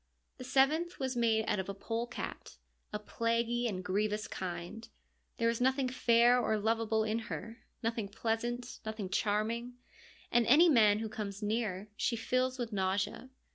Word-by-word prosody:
The - - -6
seventh 295 +7 +2
was 260 -1 -2
made 225 -2 +2
out 210 - +1
of 190 0 -4
a 200 - -4
polecat, 230 +4 -5 0.3
a 210 - -2
plaguy 230 +2 0
and 205 -5 -2
a - - -4
grievous 210 +3 -1
kind. 185 +5 -6 0.5
There 230 - +2
is 230 +1 0
nothing 260 0 +2
fair 240 0 +4
or 220 -3 +1
lovable 220 +1 +1
in 220 +1 0
her, 230 +2 -6 0.2
nothing 225 -2 -1
pleasant, 235 +4 -3
nothing 215 -3 -4
charming, 225 +5 0 0.6
and 240 -1 +3
any 325 +7 +7
man 215 -7 +5
who 220 +1 -3
comes 210 -1 -5
near 210 -2 -1
she 235 - 0
fills 255 +3 0
with 235 -3 -4
nausea. 195 +6 -1
225 Hz, 160 wpm, -32 LUFS, 210-240 Hz, 0.6 s, any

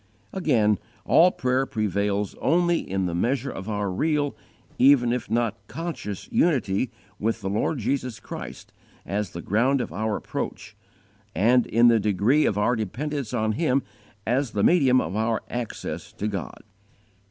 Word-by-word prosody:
Again, 115 - +2 0.3
all 175 +2 +6
prayer 130 -4 0
prevails 100 -2 -1
only 175 +2 +3
in 95 0 -2
the 85 - -2
measure 130 +9 0
of 95 +3 -7
our 105 -2 -1
real, 145 - 0 0.4
even 125 -3 +5
if 125 - -3
not 115 -1 0
conscious, 145 - -5
unity 125 - +1 0.3
with 115 +1 -1
the 95 -1 -3
Lord 110 +9 0
Jesus 125 -1 -2
Christ - - -9 0.3
as 100 -1 -2
the 85 - -8
ground 125 +7 +2
of 120 - -4
our 110 +3 -1
approach, - - -5 0.6
and 120 +5 +4
in 120 +2 +4
the 115 -1 +5
degree 105 - +2
of 100 - 0
our 120 +4 +2
dependence 125 +5 -3
on 110 -3 0
Him 135 +1 +1 0.4
as 125 +1 0
the 100 - 0
medium 135 -7 +5
of 90 -1 -3
our 110 +1 0
access 120 -2 -5
to 105 - -3
God. 95 -7 -5
115 Hz, 155 wpm, -25 LUFS, 105-135 Hz, 0.6 s, all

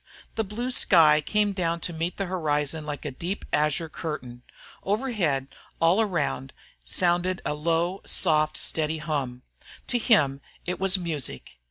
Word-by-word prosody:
The 225 - 0
blue 230 +5 -3
sky 160 -10 +6
came 210 -1 +1
down 170 -3 -1
to 175 - -3
meet 165 +2 -3
the 195 - -1
horizon 155 -4 -1
like 150 0 -5
a 145 - -2
deep 175 +9 -4
azure 150 +2 +1
curtain. 130 -7 -6 0.4
Overhead, 195 - 0 0.3
all 170 +6 +4
around, 155 -9 -1 0.3
sounded 175 - +1
a - - 0
low, 165 +5 0
soft, 155 -3 +2
steady 160 0 0
hum. 140 -5 -3 0.4
To 245 - 0
him 145 - +3 0.2
it 180 0 -3
was 195 0 +4
music. 145 - -4
165 Hz, 145 wpm, -26 LUFS, 150-185 Hz, 0.4 s, sky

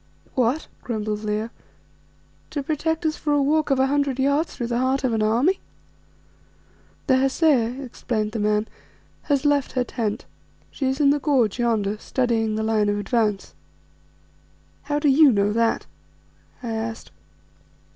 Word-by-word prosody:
"What," 255 +4 0
grumbled 215 -2 -3
Leo, 215 +2 -2 1.0
"to 285 - -3
protect 320 +2 -1
us 310 0 0
for 295 - -1
a 290 - +3
walk 305 +2 +1
of 270 -1 +2
a 265 - +4
hundred 280 -1 0
yards 280 +4 +1
through 240 - -3
the 235 0 -1
heart 260 +2 +1
of 255 -3 +1
an 220 - 0
army?" 240 - +2 1.5
"The 260 -2 +4
Hesea," 270 -2 +2
explained 220 -3 -3
the 225 - -3
man, 210 +1 +1 0.6
"has 285 0 +2
left 290 -2 +2
her 255 - +1
tent; 225 -2 -3 0.5
she 270 - -2
is 265 +2 -1
in 280 -2 +5
the 290 - +1
gorge 255 -7 +1
yonder, 215 -3 0
studying 225 -4 0
the 220 - -1
line 215 -2 +1
of 205 - 0
advance." 210 -1 -1 1.3
"How 290 0 -2
do 295 0 +1
you 285 +1 +6
know 205 -1 +1
that?" 230 0 +1 0.8
I 235 - -3
asked. 225 0 -5
245 Hz, 155 wpm, -23 LUFS, 220-280 Hz, 1.5 s, you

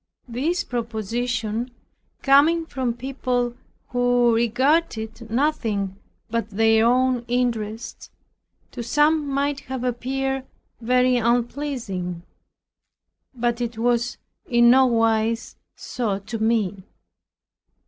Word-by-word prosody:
This 290 +9 -1
proposition, 230 0 -2 0.5
coming 305 +5 +5
from 255 -6 -2
people 250 -1 -2 0.4
who 245 -1 +3
regarded 230 -2 0
nothing 225 -7 0 0.3
but 230 0 -2
their 225 +2 +3
own 250 0 +2
interest, 235 -3 -2 0.6
to - - -6
some 295 +5 +2
might 280 +1 0
have 260 -2 -6
appeared 265 +2 -2 0.3
very 250 +1 +3
unpleasing; 235 -7 -2 1.1
but 240 0 -1
it 235 -1 -3
was 240 +1 0 0.3
in 240 0 +5
no 260 +1 +6
wise 225 -1 +1 0.2
so 220 -6 -3
to 220 +3 -6
me. 215 -3 0
240 Hz, 95 wpm, -23 LUFS, 225-260 Hz, 1.1 s, no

